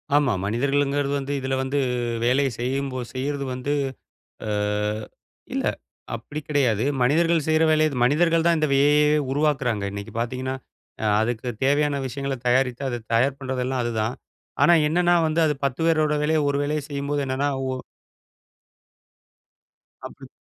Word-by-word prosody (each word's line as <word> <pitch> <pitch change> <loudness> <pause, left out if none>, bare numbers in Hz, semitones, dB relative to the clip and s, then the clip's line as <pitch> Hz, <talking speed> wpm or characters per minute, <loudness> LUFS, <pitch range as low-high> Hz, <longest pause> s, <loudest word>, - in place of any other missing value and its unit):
ஆமா. 145 -5 +3
மனிதர்கள்ங்கிறது 140 +5 0
வந்து 140 +1 -4
இதில 135 0 -3
வந்து 135 +2 -2 0.5
வேலைய 135 +3 +3
செய்யும்போ 130 +1 -2
செய்யறது 140 +2 -2
வந்து 130 +3 -2 0.7
அ - - -2 1.1
இல்ல. - - -1 0.5
அப்படி 130 +7 -6
கிடையாது, 125 -7 +2 0.2
மனிதர்கள் 160 +4 +3
செய்ற 155 0 +3
வேலைய 155 0 +3
மனிதர்கள் 165 +5 +3
தான் 170 -1 +3
இந்த 155 0 +1
ஏ 135 - +4
ஐ 140 - +5
யயே 150 0 +4
உருவாக்குறாங்க. 135 -7 0
இன்னைக்கு 100 0 -7
பார்த்தீங்கன்னா, 130 +3 -2 0.5
அ - - 0 0.2
அதுக்கு 120 +2 -2
தேவையான 145 +1 +2
விஷயங்கள 135 +1 -3
தயாரித்து, 125 0 +2
அதை 120 - -2 0.2
தயார் 130 +4 +2
பண்ணுறதெல்லாம் 130 -1 -2
அதுதான். 115 0 -1 0.5
ஆனா 175 - +6
என்னன்னா 175 +2 +3
வந்து 160 +2 +1
அது 150 - +2
10 135 +2 -2
பேரோட 155 -2 +2
வேலைய 155 +1 +2
ஒரு 140 0 0
வேலைய 150 +1 -1
செய்யும்போது, 140 0 -2
என்னென்னா? 135 +2 0 0.2
ஒ - - -1 2.3
அப்படி. - - -14
140 Hz, 140 wpm, -24 LUFS, 125-150 Hz, 2.3 s, ஆனா